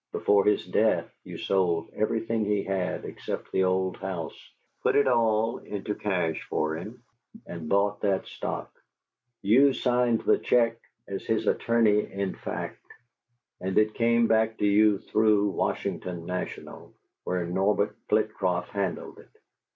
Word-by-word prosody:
"Before 100 -1 +3
his 105 -1 +2
death - - +1
you - - -8
sold 90 -4 0
everything 115 +1 0
he 105 -1 0
had, 95 -2 -2
except - - -6
the 95 - +2
old 95 0 0
house, 95 -4 -5 0.5
put - - +2
it 140 - +4
all 115 -1 +2
into 105 0 -5
cash 90 -7 -1
for 80 0 0
him, 110 +9 -9 0.4
and 85 -3 -7
bought 100 +1 +1
that 95 -2 0
stock; - - -5 0.7
you 130 +7 +5
signed 125 -3 +1
the - - +3
check 115 -1 +2 0.3
as 100 -1 -5
his 110 -1 0
attorney 110 -3 +2
in 100 -1 -2
fact, - - -6 0.8
and 95 0 -2
it 110 0 +3
came 115 0 +3
back 110 0 +2
to - - 0
you 105 0 +4
through 105 0 +2
the - - +1
Washington 90 -2 -3
National, 90 +1 -6 0.3
where 90 -1 -1
Norbert 95 +4 +1
Flitcroft 95 -5 0
handled 100 -4 -3
it. - - -17
105 Hz, 145 wpm, -27 LUFS, 95-110 Hz, 0.8 s, you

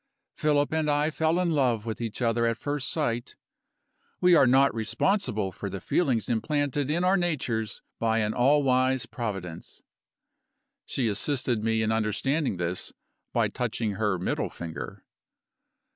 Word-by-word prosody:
"Philip 150 -2 +1
and 160 -1 +1
I 145 +2 +2
fell 160 +2 +1
in 180 -2 +1
love 125 -7 +1
with 115 0 -4
each 115 +1 -3
other 115 0 +2
at 115 -1 0
first 145 0 -2
sight 120 -7 -2 0.8
we 180 0 +5
are 145 -6 +6
not 135 +3 +5
responsible 110 - 0
for 100 - -6
the 95 0 -5
feelings 125 - 0
implanted 140 +4 0
in 170 +4 +1
our 185 +1 +4
natures 125 - -2 0.2
by 115 -1 +1
an 105 0 0
all 140 +4 +4
wise 130 -1 +2
Providence." 95 -8 -6 1.0
She 125 -4 0
assisted 120 +1 0
me 110 0 +1
in 110 - +1
understanding 110 - 0
this 85 +1 -2 0.4
by - - +2
touching 110 -3 -2
her 100 -1 0
middle 90 - -2
finger. 85 -2 -7
120 Hz, 145 wpm, -27 LUFS, 110-145 Hz, 1.0 s, are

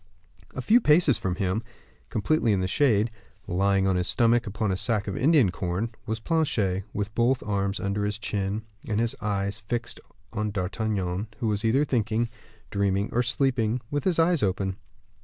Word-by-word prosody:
A - - -4
few 235 +3 +5
paces 150 - +4
from 95 -2 -1
him, 95 +2 -1 0.5
completely 115 +1 +1
in 100 - +1
the 95 - 0
shade, 110 -1 +2 0.3
lying 95 +2 +2
on 95 -1 +2
his 90 - 0
stomach, 120 -1 +3
upon 105 0 -1
a - - +1
sack 105 +1 0
of 100 - -3
Indian 135 - +4
corn, 95 +6 -3
was 110 0 -2
Planchet, 110 - 0
with 105 +1 -3
both 125 +3 +2
his - - -10
arms 100 -1 -1
under 100 +1 -1
his 105 0 -1
chin, 105 -1 -2 0.2
and 105 -1 0
his 115 0 0
eyes 100 0 -1
fixed 115 +2 -4 0.3
on 105 0 -1
D'Artagnan, 100 0 -2
who 115 - -1
was 105 +1 -1
either 130 +6 +3
thinking, 115 -3 0 0.4
dreaming, 100 0 +1
or 120 - +2
sleeping, 125 -2 +1
with 145 -1 -1
his 185 -3 +2
eyes 165 -1 +3
open. 95 -1 0
105 Hz, 175 wpm, -26 LUFS, 100-120 Hz, 0.5 s, few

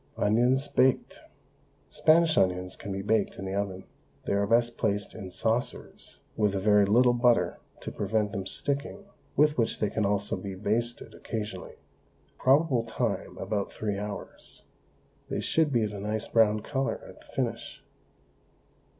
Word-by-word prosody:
ONIONS, 125 +6 +3
BAKED. 130 -1 +2 0.7
Spanish 160 0 +4
onions 90 0 +1
can 100 - -7
be 95 0 -3
baked 105 0 +1
in 95 - -6
the 95 - -4
oven. 100 -2 -2 0.4
They - - 0
are 100 0 +1
best 120 +1 +3
placed 105 -2 -1
in 95 - -7
saucers, 115 +6 -3
with 105 -2 +1
a - - 0
very 105 0 +4
little 120 +4 +5
butter 120 -1 +2 0.2
to - - -5
prevent 105 0 0
them 95 -1 -4
sticking, 140 - -2 0.3
with 150 -2 +3
which 115 - +1
they 105 -2 -1
can 110 - 0
also 100 0 0
be 100 -1 -6
basted 115 +5 -2
occasionally. 105 -4 -6 0.6
Probable 135 -2 +3
time 115 -1 -3
about 100 -2 -2
three 105 -2 -3
hours. 105 -1 -5 0.7
They - - -2
should 160 -2 +1
be 120 -4 +2
of 105 -1 -2
a 100 - -6
nice 105 +2 -2
brown 110 -2 +3
colour 135 +4 -2
at - - -13
the - - -20
finish. - - -4
110 Hz, 155 wpm, -28 LUFS, 100-120 Hz, 0.7 s, little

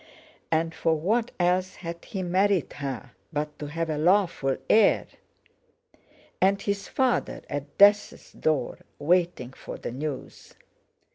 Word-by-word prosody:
And 165 0 +1
for 160 0 +1
what 220 +9 0
else 180 +1 +1
had 170 -1 -7
he 190 -4 -4
married 185 0 +1
her 135 -4 -5 0.2
but 150 -1 -3
to 150 - -5
have 165 +3 -2
a 155 -2 -2
lawful 170 -6 +2
heir? 220 -1 +5 1.4
And 195 +1 +4
his 200 -1 -2
father—at 150 - -2
death's 205 +1 +4
door, 155 -3 -1 0.2
waiting 170 -5 +1
for - - -8
the - - -6
news! 140 +2 -6
170 Hz, 125 wpm, -26 LUFS, 150-195 Hz, 1.4 s, heir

